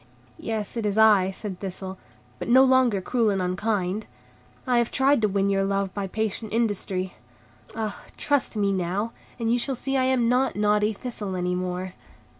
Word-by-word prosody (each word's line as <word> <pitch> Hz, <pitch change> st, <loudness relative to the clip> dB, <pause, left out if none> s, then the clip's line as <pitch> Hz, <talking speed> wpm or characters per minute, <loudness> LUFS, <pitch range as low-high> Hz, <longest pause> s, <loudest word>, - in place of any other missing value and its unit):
"Yes, 220 Hz, 0 st, -4 dB
it 230 Hz, -, -1 dB
is 205 Hz, 0 st, -1 dB
I," 210 Hz, -4 st, +6 dB
said 195 Hz, -1 st, -6 dB
Thistle, 190 Hz, -1 st, -6 dB, 0.4 s
"but -, -, -5 dB
no 255 Hz, +2 st, +7 dB
longer 260 Hz, -6 st, +4 dB
cruel 230 Hz, +2 st, +1 dB
and 195 Hz, -1 st, 0 dB
unkind. 185 Hz, +2 st, -1 dB, 0.6 s
I 250 Hz, -2 st, +3 dB
have 235 Hz, -, +1 dB
tried 270 Hz, -1 st, +3 dB
to 215 Hz, -, +3 dB
win 200 Hz, 0 st, +1 dB
your 195 Hz, 0 st, +2 dB
love 195 Hz, -1 st, -1 dB
by 200 Hz, -1 st, -3 dB
patient 220 Hz, +1 st, -3 dB
industry. 200 Hz, -4 st, -1 dB, 0.6 s
Ah, 220 Hz, -2 st, -4 dB, 0.2 s
trust 285 Hz, -5 st, 0 dB
me 200 Hz, -2 st, +1 dB
now, 190 Hz, +5 st, -1 dB, 0.3 s
and 230 Hz, -1 st, 0 dB
you 245 Hz, -, +2 dB
shall 270 Hz, +2 st, -2 dB
see 270 Hz, +2 st, -2 dB
I 260 Hz, -, +2 dB
am 255 Hz, -3 st, +2 dB
not 255 Hz, +2 st, +2 dB
naughty 210 Hz, +1 st, +2 dB
Thistle 205 Hz, -3 st, -5 dB
any 180 Hz, 0 st, -1 dB
more." 180 Hz, 0 st, -3 dB
210 Hz, 180 wpm, -25 LUFS, 190-235 Hz, 0.6 s, no